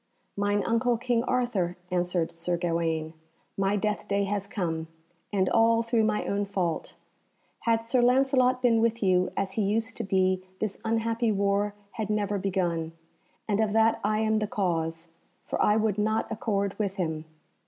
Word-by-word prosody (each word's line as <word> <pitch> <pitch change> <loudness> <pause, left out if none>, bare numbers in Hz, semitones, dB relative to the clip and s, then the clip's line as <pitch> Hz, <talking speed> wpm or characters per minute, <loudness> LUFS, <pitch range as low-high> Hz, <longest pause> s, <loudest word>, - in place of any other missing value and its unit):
"Mine 205 0 +1
uncle 230 +1 +2
King 240 0 0
Arthur," 225 -10 0
answered 175 -2 0
Sir 170 +1 -2
Gawaine, 165 -2 -1 0.4
"my 195 +1 +1
death 210 0 -1
day 200 0 +1
has 200 0 -2
come, 165 -7 -3 0.4
and 190 -2 +1
all 230 0 +4
through 230 -1 +2
my 215 -1 0
own 200 0 0
fault. 185 -5 -2 0.7
Had 225 0 +2
Sir 245 +2 +2
Lancelot 255 0 +3
been 230 -2 +4
with 230 -1 +1
you 185 -1 +3
as 190 - -1
he 215 - -1
used 225 +3 0
to 230 - -2
be 185 -2 +1
this 210 -1 -3
unhappy 230 0 0
war 200 0 +1 0.2
had 215 -2 -4
never 205 -1 0
begun, 175 -4 -1 0.5
and 210 0 +1
of 215 -2 +1
that 225 0 +3
I 215 +1 +1
am 220 0 +2
the 215 - -1
cause, 165 -4 -2 0.4
for - - -2
I 210 - +4
would 215 -2 +1
not 215 +1 0
accord 200 -3 -1
with 200 -2 -1
him. 160 -4 -2
205 Hz, 165 wpm, -27 LUFS, 185-225 Hz, 0.7 s, all